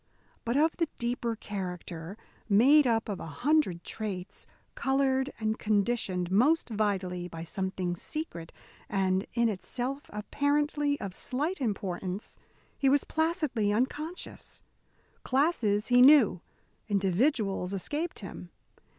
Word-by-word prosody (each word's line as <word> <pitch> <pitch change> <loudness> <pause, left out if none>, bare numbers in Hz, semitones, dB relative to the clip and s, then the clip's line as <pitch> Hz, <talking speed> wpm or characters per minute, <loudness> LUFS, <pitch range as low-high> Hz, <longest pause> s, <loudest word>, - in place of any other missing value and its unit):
But 235 +3 +1
of 315 +2 +2
the 330 -3 0
deeper 235 -1 -1
character, 180 -3 -6 0.3
made 265 +8 +6
up 225 -1 +1
of 205 -4 -4
a - - -6
hundred 190 - +1
traits, 195 -4 -5 0.3
coloured 265 0 +1
and 220 0 -1
conditioned 200 -4 0
most 275 +12 +3
vitally 190 -4 -1
by 165 -1 -7
something 185 0 -2
secret 175 - -5 0.4
and 190 -1 +1
in 235 -1 +3
itself 250 +7 -3
apparently 285 +6 0
of 195 -3 -5
slight 295 - -1
importance, 195 -3 -3 0.4
he 275 - +4
was 280 +1 +4
placidly 315 - 0
unconscious. 295 +10 -3 0.6
Classes 255 -7 +1
he 245 0 +6
knew. 255 - +7 0.5
Individuals 195 - +1
escaped 295 - -2
him. 180 -2 -8
220 Hz, 115 wpm, -29 LUFS, 190-280 Hz, 0.6 s, knew